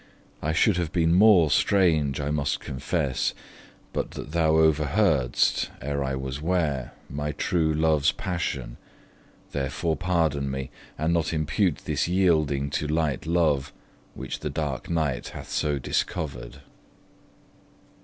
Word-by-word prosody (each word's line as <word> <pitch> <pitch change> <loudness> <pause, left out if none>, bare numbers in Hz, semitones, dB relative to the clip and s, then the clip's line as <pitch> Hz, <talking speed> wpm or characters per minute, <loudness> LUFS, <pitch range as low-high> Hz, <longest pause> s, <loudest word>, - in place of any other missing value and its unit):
I 75 - 0
should 90 +4 +3
have 85 -3 -1
been 85 -1 +2
more 90 -5 +6
strange, 80 -6 +3
I 75 0 -2
must 75 -1 0
confess, 65 -1 -2 0.6
But - - -2
that 75 - -7
thou 80 -1 +2
over 80 -1 +4
heard'st, 75 - +2
ere 70 +1 -2
I 65 0 -2
was 65 +1 -5
ware, 80 -7 -1
My 75 +2 -3
true 80 0 +1
love's 75 -2 +3
passion; 70 -9 -4 0.7
therefore 70 +4 -1
pardon 80 -6 0
me, 65 -1 -4 0.3
And 80 +2 0
not 85 -1 0
impute 80 +3 0
this - - 0
yielding 80 -7 +2
to 75 0 -1
light 75 -2 -1
love, 75 -5 +1 0.4
Which - - -5
the - - -3
dark - - -3
night 80 -7 -1
hath - - -9
so 75 -1 0
discovered. 75 +3 -3
75 Hz, 135 wpm, -26 LUFS, 70-85 Hz, 0.7 s, more